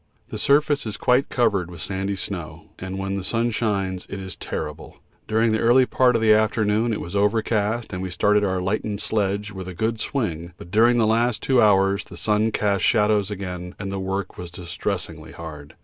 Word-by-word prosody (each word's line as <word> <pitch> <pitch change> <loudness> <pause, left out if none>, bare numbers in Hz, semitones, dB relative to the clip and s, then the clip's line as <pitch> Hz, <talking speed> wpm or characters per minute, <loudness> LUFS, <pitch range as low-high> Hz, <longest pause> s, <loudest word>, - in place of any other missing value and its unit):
The - - -5
surface 145 -2 +2
is 105 - -4
quite 125 +2 +2
covered 100 -8 +1
with 85 -2 -10
sandy 95 +4 -2
snow, 90 -5 -7
and 95 +1 -5
when 95 0 -3
the 100 -1 -3
sun 115 +5 0
shines 100 -5 -1
it 100 - -5
is 95 -1 -7
terrible. 75 +1 -6 0.3
During 110 +1 +2
the 110 - +1
early 125 +3 +5
part 125 -1 +3
of 115 - +1
the 110 -1 +6
afternoon 110 +1 +2
it 110 - -1
was 85 +4 -6
overcast, 105 +2 +1
and 90 - -3
we 95 - -3
started 105 +3 +2
our 95 -2 0
lightened 105 +1 -2
sledge 105 -1 -1
with 95 -2 -7
a 90 - -7
good 110 +3 -1
swing, 85 - -3
but 85 - -12
during 115 +3 +5
the 115 - +4
last 115 0 +1
two 130 -2 +4
hours 100 -1 +4
the - - -11
sun 105 +1 +1
cast 100 -3 0
shadows 105 -3 +3
again, 90 -3 -6
and 100 -2 -5
the 100 - -3
work 95 0 -3
was 90 -1 -6
distressingly 90 -3 -5
hard. 80 -2 -9
100 Hz, 200 wpm, -23 LUFS, 95-110 Hz, 0.3 s, the